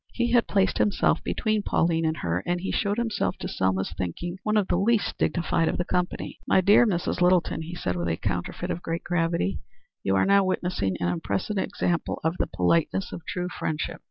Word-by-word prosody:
He 240 -1 0
had 240 -1 +4
placed 195 -2 +1
himself 205 - +2
between 215 -2 0
Pauline 165 -4 +1
and 160 0 0
her, 85 +1 -1
and 175 0 0
he 190 - -3
showed 205 0 0
himself, 225 - -1
to - - -5
Selma's 95 0 -1
thinking, 170 - -4
one 215 0 +1
of 205 -3 +2
the - - +1
least 215 +4 +1
dignified 165 -1 +1
of - - 0
the 175 - -1
company. 180 -1 -2
"My - - +5
dear 205 +5 +6
Mrs. 180 -2 -1
Littleton," 180 -2 +3
he 165 +2 -6
said, 90 - -2
with 85 0 -2
a 80 -1 0
counterfeit 95 - -3
of 175 - -4
great 165 0 -3
gravity, 165 - 0 0.4
"you 95 - +1
are 95 - +3
now 200 0 +5
witnessing 175 - -1
an 85 - 0
impressive 100 - -2
example 185 -3 -1
of 160 +2 +1
the - - +1
politeness 150 - +1
of - - -6
true 180 0 -2
friendship. 155 -3 -3
175 Hz, 205 wpm, -26 LUFS, -, 0.4 s, dear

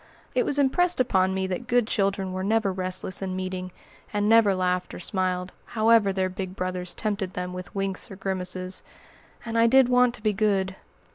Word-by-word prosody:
It - - +1
was 285 - +2
impressed 345 +6 +2
upon 190 -7 +2
me 190 0 0
that 190 +6 -4
good 245 -2 +3
children 195 -3 0
were 185 0 -3
never 210 -1 +1
restless 185 0 -3
in 190 -1 -3
meeting, 185 0 -4 0.4
and 205 0 0
never 220 -3 +5
laughed 180 0 -1
or - - -7
smiled, 185 0 -2 0.2
however 220 -2 +5
their 190 -1 0
big 185 0 -6
brothers 180 -1 -4
tempted 200 -3 -2
them 180 0 -4
with 185 +2 -8
winks 195 -1 -3
or 195 - -8
grimaces. 185 -1 -3 0.6
And 230 0 -1
I 230 - +6
did 260 +1 +5
want 250 -1 +4
to 210 - -9
be 215 -1 +2
good. 195 -2 +1
190 Hz, 190 wpm, -26 LUFS, 185-225 Hz, 0.6 s, I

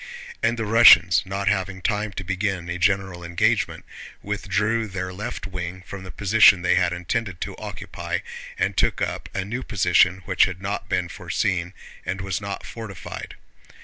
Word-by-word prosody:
And 120 - +1
the 115 - -2
Russians, 105 -6 +7
not 100 +1 -3
having 95 -1 0
time 105 +2 -1
to 95 - -5
begin 95 -1 -2
a 85 +1 -3
general 95 -1 0
engagement, 85 0 0 0.4
withdrew 105 +2 -1
their 95 -2 -5
left 105 +3 -5
wing 90 -1 -6
from 100 0 -8
the 95 - -9
position 100 -2 +5
they 90 - +3
had 90 -1 +2
intended 90 +2 -3
to - - -4
occupy - - -5 0.4
and - - 0
took - - +1
up - - -3
a 95 -1 -1
new 120 +6 -4
position 90 -4 +2
which 95 -1 +4
had 90 -1 -5
not 100 +2 -4
been 90 -2 0
foreseen 90 +1 -2 0.3
and 95 - -3
was 95 0 -3
not 100 0 -5
fortified. 110 -6 -8
95 Hz, 165 wpm, -23 LUFS, 90-105 Hz, 0.4 s, Russians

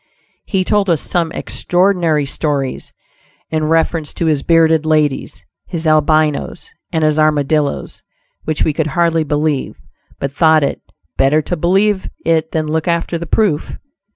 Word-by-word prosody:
He 190 -3 0
told 205 0 +1
us 165 -3 +2
some 170 0 -1
extraordinary 175 -5 0
stories 140 -2 -3 0.6
in 155 -1 0
reference 160 -1 0
to 170 - -1
his 155 -3 +1
bearded 160 -1 +3
ladies, 155 -3 -1 0.2
his 170 -2 -5
Albinos, 155 - +1 0.2
and 160 -3 0
his 155 0 +2
Armadillos, 150 -1 0 0.4
which 155 - -1
we 155 - +1
could 155 +1 -1
hardly 165 +1 +1
believe, 150 -1 -1 0.4
but 140 - -3
thought 155 +1 +3
it 140 - -2 0.4
"better 150 +3 +3
to 175 - -2
believe 190 +4 +1 0.2
it 160 -1 +1
than 155 -1 -1
look 155 +1 -2
after 170 0 -1
the 170 - -6
proof'." 185 -5 0
160 Hz, 145 wpm, -16 LUFS, 150-170 Hz, 0.6 s, bearded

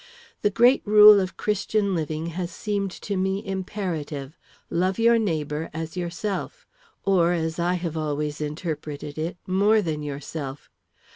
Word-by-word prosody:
The 205 - +3
great 240 +6 +4
rule 210 0 +9
of 185 -1 -3
Christian 210 -1 0
living 155 -1 -2
has 175 0 -3
seemed 200 0 -2
to 200 - -2
me 190 +1 -1
imperative. 175 -7 -4 0.4
Love 185 +2 +1
your 230 0 +5
neighbor 155 -6 -2
as 160 +1 -5
yourself, 180 +3 -4 0.4
or, 180 -3 +3
as 160 0 -2
I 175 +1 +1
have 170 -3 -3
always 150 -1 -2
interpreted 150 -1 -5
it, 165 +3 -3
more 200 +4 +3
than 160 -6 -2
yourself. 145 -1 -6
175 Hz, 140 wpm, -25 LUFS, 155-200 Hz, 0.4 s, rule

